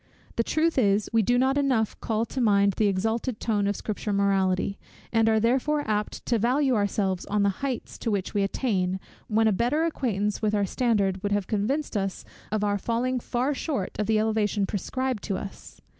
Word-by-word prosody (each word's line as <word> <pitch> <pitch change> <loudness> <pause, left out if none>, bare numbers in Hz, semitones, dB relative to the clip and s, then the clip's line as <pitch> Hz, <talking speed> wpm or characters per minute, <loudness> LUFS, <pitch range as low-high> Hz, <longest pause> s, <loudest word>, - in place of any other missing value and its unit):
The 230 - +2
truth 315 +3 +1
is, 205 -2 +2
we 225 - +5
do 245 +4 +2
not 265 +3 +2
enough 255 -6 +1
call 225 0 0
to 260 - -4
mind 200 -3 +4
the 215 - +3
exalted 220 +4 -1
tone 205 -3 0
of 205 - 0
Scripture 210 +1 -3
morality; 195 -1 +1 0.3
and 225 -1 +4
are 220 0 +3
therefore 265 +6 +1
apt 210 -1 -2
to 235 -2 +1
value 260 +4 +2
ourselves 200 -3 0
on 205 0 +1
the 200 - +4
heights 270 -3 -4
to 230 - -2
which 200 -3 -1
we 205 - +1
attain, 190 -3 0 0.3
when 220 0 +3
a - - +4
better 245 - +1
acquaintance 210 -10 -1
with 215 -1 +1
our 205 -1 +2
standard 200 -4 +1
would 205 - -2
have 205 -2 0
convinced 230 +9 -1
us 195 -2 -2 0.3
of 215 -1 0
our 205 -1 +1
falling 245 +4 0
far 250 +4 -1
short 270 - -2
of 210 - 0
the 220 -1 +3
elevation 215 -2 +1
prescribed 255 +4 -2
to 195 - -1
us. 195 - -9
215 Hz, 195 wpm, -26 LUFS, 200-245 Hz, 0.3 s, we